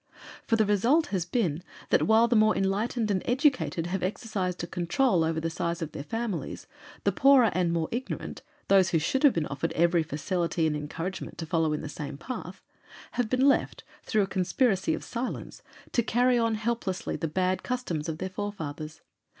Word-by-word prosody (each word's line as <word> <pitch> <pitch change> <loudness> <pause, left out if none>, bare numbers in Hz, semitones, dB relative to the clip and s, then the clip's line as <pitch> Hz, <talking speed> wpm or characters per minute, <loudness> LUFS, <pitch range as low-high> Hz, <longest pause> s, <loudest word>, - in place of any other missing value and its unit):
For 225 - +3
the 220 -1 +3
result 235 - +3
has 180 -3 0
been 175 -6 0 0.3
that - - +3
while 220 +2 +5
the 235 - +2
more 215 0 +4
enlightened 210 +3 0
and 185 -2 +1
educated 255 - +1
have 180 +2 -2
exercised 185 -2 -2
a - - -1
control 175 +3 +1
over 160 0 0
the 165 - -2
size 170 0 -2
of 155 - -6
their - - -6
families, 225 +3 -4 0.4
the - - +3
poorer 265 -6 +5
and 175 -1 +1
more 165 -1 0
ignorant 250 +3 -4 0.3
those 190 -2 +5
who 170 - +2
should 160 - 0
have 290 -4 +6
been 165 -2 0
offered 160 +4 -3
every 170 +1 +3
facility 165 +2 -1
and 155 -1 +1
encouragement 165 +5 -5
to 165 - -4
follow 160 -1 +1
in 150 - -2
the 155 - -5
same 145 -1 -6
path 255 - -7 0.5
have 245 -3 -1
been 255 +3 +3
left, 275 - +1 0.2
through 215 -2 +1
a - - +1
conspiracy 190 0 +1
of - - -8
silence, 245 +1 -5 0.3
to 235 - +2
carry 245 +2 +2
on 230 -1 +1
helplessly 215 -4 -2
the 165 - -2
bad 185 +3 0
customs 180 -12 -3
of 160 - -3
their 185 +3 -4
forefathers. 160 -6 -6
190 Hz, 190 wpm, -28 LUFS, 165-230 Hz, 0.5 s, have